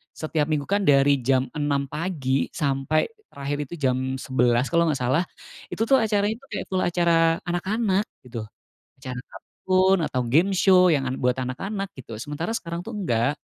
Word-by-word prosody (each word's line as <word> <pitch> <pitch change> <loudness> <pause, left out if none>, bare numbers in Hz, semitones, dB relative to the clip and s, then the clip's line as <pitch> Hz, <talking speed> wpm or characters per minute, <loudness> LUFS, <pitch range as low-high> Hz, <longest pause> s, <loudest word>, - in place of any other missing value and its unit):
Setiap 155 -1 -1
Minggu 150 -2 0
kan 200 +6 0
dari 140 0 +5
jam 130 +1 +1
6 145 -2 0
pagi, 150 -6 -1
sampai 145 - 0 0.2
terakhir 140 +1 -4
itu 170 - -7
jam 130 -3 0
11 125 -1 +1
kalau 170 0 +3
nggak 155 - +1
salah, 130 +8 +2 0.4
itu 225 - -2
tuh 265 +4 +4
acaranya 210 -2 +1
itu 275 - -19
kayak - - -3
full 185 - +1
acara 170 -2 +2
anak-anak, 195 +3 0 0.2
gitu. 115 -3 -7 0.5
Acara 130 -1 -6
kartun, 190 +1 +1
atau 130 - 0
game 160 +11 +3
show, 185 -1 +5
yang 140 -4 +1
an 130 - -2
buat 125 +1 +1
anak-anak, 195 +11 -4
gitu. 115 -4 -9
Sementara 150 - -4
sekarang 170 0 -6
tuh 225 - -8
enggak. 145 - 0
150 Hz, 170 wpm, -24 LUFS, 130-185 Hz, 0.5 s, dari